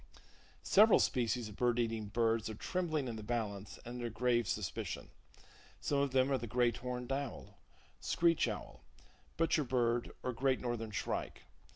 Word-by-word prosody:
Several 215 +2 +7
species 120 -1 +1
of 105 - -10
bird 120 0 +2
eating 115 -2 -1
birds 115 +1 +1
are 110 - -5
trembling 155 - -1
in 115 -2 -4
the - - -6
balance, 105 -3 -3
and 120 +1 -6
under 120 -1 -3
grave 120 0 +1
suspicion. - - -3 0.7
Some 145 - 0
of 140 0 +2
them 130 +1 +3
are 135 - +2
the 120 - -5
Great 120 0 +2
Horned 125 0 -4
Owl, 140 +1 -4 0.4
Screech 170 -1 +2
Owl, - - -6 0.5
Butcher 165 -1 +2
Bird 120 -2 +1
or 125 - -1
Great 130 +2 +1
Northern 120 -3 -3
Shrike. 105 - -3
120 Hz, 160 wpm, -35 LUFS, 115-135 Hz, 0.7 s, Several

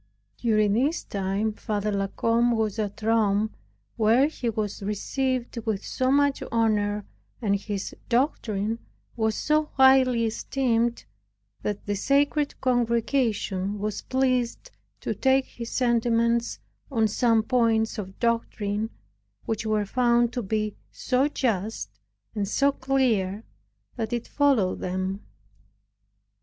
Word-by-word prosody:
During 215 -3 +2
this 275 +9 +1
time 200 +2 -1
Father 210 0 -2
La 195 -1 0
Combe 235 +4 +2
was 220 -1 -1
at 210 0 -3
Rome, 215 -1 +2 0.5
where 230 +4 +4
he 275 -5 -2
was 210 -2 -3
received 250 +5 -2
with 220 -3 -3
so 255 0 0
much 285 0 +3
honor, 210 -3 +1 0.3
and 205 -4 +1
his 200 -1 -4
doctrine 230 -4 0 0.4
was 220 -1 0
so 305 0 +1
highly 265 -3 +5
esteemed, 235 0 0 0.6
that 205 -1 -3
the 205 - -1
Sacred 285 +6 +1
Congregation 230 -5 0
was 210 0 -3
pleased 255 - 0 0.3
to - - -2
take 265 0 +2
his 235 -1 -8
sentiments 235 -1 +1 0.3
on 225 -5 +2
some 225 +1 +2
points 225 -2 +1
of 190 -1 -7
doctrine, 220 -2 -1 0.6
which 220 0 -2
were 215 -1 +1
found 240 +1 +2
to 245 - -2
be 215 0 -2 0.2
so 260 +2 +1
just, 225 -7 -2 0.3
and 205 -3 -2
so 280 +7 +3
clear, 235 -8 0 0.5
that 225 -1 -3
it 240 -1 -2
followed 270 -10 +2
them. 185 +2 -3
230 Hz, 120 wpm, -26 LUFS, 210-250 Hz, 0.6 s, highly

